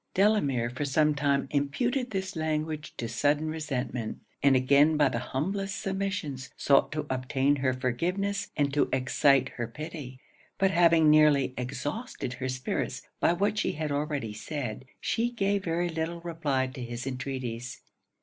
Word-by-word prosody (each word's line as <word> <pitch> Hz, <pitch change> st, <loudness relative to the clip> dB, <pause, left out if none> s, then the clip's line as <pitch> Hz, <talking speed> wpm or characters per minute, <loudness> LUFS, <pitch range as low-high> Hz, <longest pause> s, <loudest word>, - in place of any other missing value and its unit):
Delamere 145 Hz, -, +2 dB
for 130 Hz, +4 st, -3 dB
some 150 Hz, +2 st, +3 dB
time 140 Hz, -1 st, +1 dB
imputed 240 Hz, -, 0 dB
this 190 Hz, -3 st, -3 dB
language 155 Hz, -1 st, -2 dB
to 115 Hz, -, -3 dB
sudden 145 Hz, +6 st, +1 dB
resentment; 130 Hz, -7 st, -3 dB, 0.2 s
and 140 Hz, -1 st, +5 dB
again 140 Hz, +4 st, +5 dB
by 145 Hz, -2 st, +4 dB
the 120 Hz, -2 st, -2 dB
humblest 190 Hz, +11 st, -2 dB
submissions 190 Hz, -9 st, -3 dB
sought 140 Hz, -1 st, +4 dB
to 155 Hz, -1 st, -2 dB
obtain 130 Hz, +2 st, +1 dB
her 130 Hz, -1 st, +1 dB
forgiveness 180 Hz, +11 st, -1 dB
and 140 Hz, -2 st, +1 dB
to 145 Hz, -, +2 dB
excite 130 Hz, +1 st, +3 dB
her 120 Hz, -2 st, -2 dB
pity. 145 Hz, -1 st, -8 dB, 0.4 s
But 195 Hz, -1 st, +3 dB
having 165 Hz, -3 st, +5 dB
nearly 150 Hz, -4 st, +5 dB
exhausted 130 Hz, -, -4 dB
her 130 Hz, +1 st, -4 dB
spirits 130 Hz, 0 st, -3 dB, 0.2 s
by -, -, +4 dB
what 205 Hz, +4 st, +1 dB
she -, -, 0 dB
had 155 Hz, -1 st, -3 dB
already 145 Hz, -6 st, -2 dB
said, 125 Hz, +1 st, -5 dB
she 235 Hz, +1 st, 0 dB
gave 200 Hz, -4 st, 0 dB
very 170 Hz, +1 st, 0 dB
little 165 Hz, +1 st, -3 dB
reply 155 Hz, -6 st, -1 dB
to 130 Hz, 0 st, -7 dB
his 120 Hz, +1 st, -5 dB
entreaties. 130 Hz, -2 st, -4 dB
145 Hz, 150 wpm, -28 LUFS, 130-170 Hz, 0.4 s, and